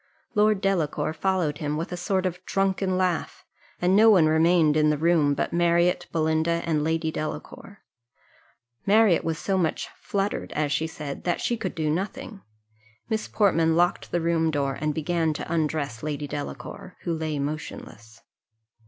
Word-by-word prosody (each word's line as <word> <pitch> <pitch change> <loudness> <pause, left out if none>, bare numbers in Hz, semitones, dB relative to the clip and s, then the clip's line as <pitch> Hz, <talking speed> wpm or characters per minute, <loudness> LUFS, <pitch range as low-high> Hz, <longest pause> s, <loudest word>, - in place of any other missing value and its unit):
Lord 210 -1 +3
Delacour 160 -6 0
followed 165 -3 0
him 150 -2 -2
with 165 +3 -4
a - - -2
sort 185 +1 -1
of 180 0 -3
drunken 195 -1 0
laugh; 180 -2 -1 0.3
and 180 +2 +3
no 220 +2 +7
one 185 -7 +6
remained 160 0 +4
in 155 0 +4
the 150 - +1
room 155 -2 +3
but - - -2
Marriott, 175 +1 +2
Belinda, 160 +1 +1
and 155 -3 0
Lady 160 0 0
Delacour. 155 +6 -7 1.0
Marriott 210 -3 +5
was 165 -1 -2
so 190 +1 -1
much 165 -3 -1
fluttered, 200 +1 -2
as 150 -1 -1
she 160 +1 0
said, 150 -3 -7
that 175 - 0
she 240 - 0
could 195 -5 -4
do 155 -2 -1
nothing. 200 - -3 0.7
Miss 220 -1 -1
Portman 165 -6 +2
locked 175 +1 +1
the 175 - -1
room 165 -1 +1
door, 140 -3 -1
and 150 -1 -1
began 160 0 0
to 160 - -5
undress 150 -7 -1
Lady 150 -1 -3
Delacour, 145 - -7
who 170 - -2
lay 155 -2 -2
motionless. 140 -6 -6
165 Hz, 160 wpm, -25 LUFS, 155-185 Hz, 1.0 s, no